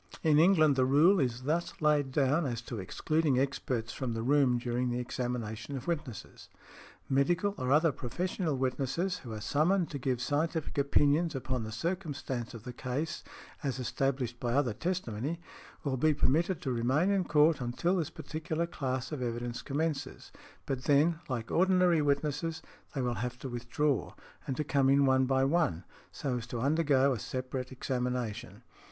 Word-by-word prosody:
In 150 -2 +5
England 160 -4 +5
the 130 - +4
rule 155 +9 +5
is 125 -3 -1
thus 160 +5 -1
laid 150 -3 +2
down 145 +3 +2
as 120 -2 -2
to 115 -1 -6
excluding 155 - 0
experts 125 -4 -1
from 130 -3 -3
the 115 0 -3
room 135 -1 +3
during 120 +1 -1
the 120 - -1
examination 120 0 -4
of 125 - -7
witnesses; 150 -9 -5 0.6
"medical 175 +9 +2
or 130 0 -2
other 155 +2 +5
professional 160 - -2
witnesses, 135 +8 -1
who 120 - -9
are 110 - -5
summoned 165 - +1
to 140 - -4
give 125 -1 -1
scientific 150 +5 -1
opinions 145 +3 +2
upon 130 -2 -2
the 110 - -6
circumstances 145 - -3
of 110 - -9
the 125 - -7
case 130 +6 -3 0.4
as 135 -4 -2
established 130 -1 -1
by 120 -1 -1
other 130 -4 +2
testimony, 165 - -3 0.4
will 135 -3 -1
be 155 +3 +3
permitted 165 +7 +1
to 130 - -1
remain 130 +10 +2
in 195 -2 +2
court 155 -2 +3
until 170 +10 0
this 165 -4 -1
particular 160 +1 -3
class 130 -6 -3
of 150 -4 -4
evidence 120 0 -3
commences, 145 -2 -3 0.3
but 130 -2 -3
then, 155 +3 +3
like 120 -3 -3
ordinary 180 -2 +4
witnesses, 150 +3 -1 0.3
they 135 - 0
will 120 -1 0
have 125 0 -3
to 135 - -6
withdraw, 120 +2 -1 0.3
and 135 - -2
to 150 - 0
come 140 -3 +2
in 140 +1 +5
one 130 -1 +3
by 135 0 +2
one, 140 - +1 0.3
so 130 -3 -2
as 115 -1 -6
to 120 - -4
undergo 140 0 +3
a 120 - -4
separate 130 +1 -4
examination." 125 -3 -3
135 Hz, 170 wpm, -31 LUFS, 125-155 Hz, 0.6 s, In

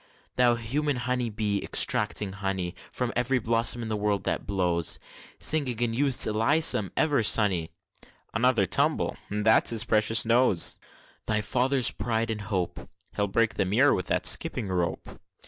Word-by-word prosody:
Thou 120 -1 +3
human 140 +6 -2
humming 125 -2 -3
bee, 105 -1 -2
extracting 105 -2 +2
honey 95 -2 -4 0.2
From 125 -1 -4
ev'ry 125 +2 0
blossom 115 +1 +1
in - - -6
the 110 - -3
world 105 -1 -2
that - - -4
blows, 90 -4 0 0.4
Singing 140 -7 +1
in 120 -1 -1
Youth's 135 +1 +3
Elysium 115 - +2
ever 145 -5 +1
sunny, 100 -7 +2 0.6
(Another 115 -3 +1
tumble! - - 0
that's 105 +2 +2
his 115 -2 +3
precious 110 +1 +2
nose!) 115 -5 +2 0.5
Thy 105 -1 0
father's 125 +4 +2
pride 115 -1 -3
and 105 -1 -5
hope! 95 -3 -5 0.3
(He'll 100 - -1
break 115 +3 0
the - - -1
mirror 120 +10 +2
with 90 - -4
that - - -1
skipping 100 - +2
rope!) 90 -2 -3
110 Hz, 150 wpm, -26 LUFS, 100-125 Hz, 0.6 s, Thou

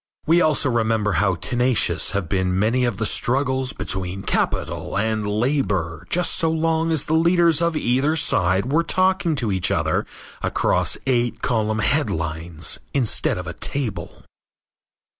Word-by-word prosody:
We 170 +2 +4
also 150 -4 +2
remember 110 -3 +1
how 95 -1 +1
tenacious 125 +5 +1
have 100 -4 -2
been 95 0 0
many 115 +6 +2
of 120 -5 -2
the 110 - -1
struggles 130 +2 0
between 95 -3 -4
capital - - -2
and 110 0 -1
labor 105 - -1
just 180 0 +1
so 165 - +1
long 160 0 0
as 160 -3 -1
the 155 - -2
leaders 170 0 +3
of 170 -2 +1
either 135 +4 +1
side 95 - +1
were 160 +3 +3
talking 185 -1 +1
to 120 -6 -1
each 95 -2 0
other - - 0 0.3
across - - +1
eight 120 -3 0
column 110 -2 0
headlines 85 - -1 0.2
instead 125 -8 +1
of 90 - -5
a 85 - -5
table. 105 - -4
120 Hz, 145 wpm, -22 LUFS, 95-155 Hz, 0.3 s, We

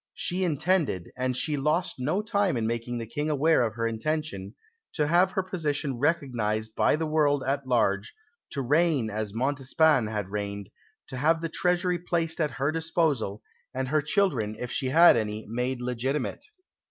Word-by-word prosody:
She 185 +2 -1
intended 160 - 0
and 130 0 -1
she 150 +2 0
lost 150 +3 0
no 155 +11 0
time 200 - +1
in 115 - -1
making 115 +1 -2
the 115 - -4
King 145 +7 -3
aware 155 +1 +3
of 110 -3 -1
her 115 -1 -1
intention 115 -3 -3 0.4
to 150 - +2
have 175 +4 +3
her 190 - 0
position 150 -8 -2
recognised 115 -8 0
by - - +3
the 160 +1 -2
world 150 -3 +2
at 135 0 -1
large, 105 -5 +1 0.4
to 140 - -2
reign 145 -4 +2
as 105 -1 -3
Montespan 135 +2 +2
had 105 -3 -3
reigned, 100 -1 -5 0.4
to 130 - -6
have 160 +5 +2
the 165 0 -3
Treasury 180 +1 0
placed 165 -1 -1
at 150 - +2
her 140 +3 +1
disposal, 155 - -1 0.3
and 130 0 -2
her 155 +1 +2
children, 145 - 0
if 125 - -5
she 130 - -1
had 165 +6 +7
any, 110 -1 -2
made 125 +3 -2
legitimate. 125 +3 -2
140 Hz, 170 wpm, -27 LUFS, 115-160 Hz, 0.4 s, had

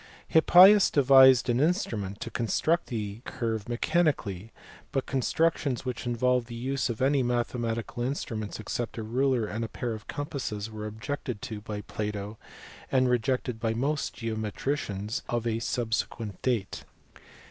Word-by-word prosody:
Hippias 185 +5 +7
devised 130 -2 +6
an 120 0 +2
instrument 115 - 0
to - - -5
construct 155 +8 0
the 105 -3 -4
curve 115 -2 -3
mechanically; 120 - 0 0.4
but 135 - -1
constructions 140 0 0
which 125 -1 -4
involved 125 0 +1
the 120 - -8
use 130 +3 -1
of 120 +1 -2
any 140 0 +3
mathematical 120 -1 -2
instruments 115 -5 -3
except 115 +3 -4
a 115 - -3
ruler 125 +1 +1
and 110 +2 -4
a - - -2
pair 115 +2 -4
of 110 -1 -9
com 145 - -3
passes 110 -8 -4
were 110 0 -5
objected 125 +2 -5
to 110 -2 -5
by 105 -1 -5
Plato, 105 0 -5 0.5
and 130 -1 +3
rejected 125 0 0
by 115 0 -1
most 140 +4 -1
geometricians 110 0 -3
of 120 -1 -1
a 115 -1 0
subsequent 115 -3 -2
date. 115 -7 -1
120 Hz, 145 wpm, -28 LUFS, 110-135 Hz, 0.5 s, Hippias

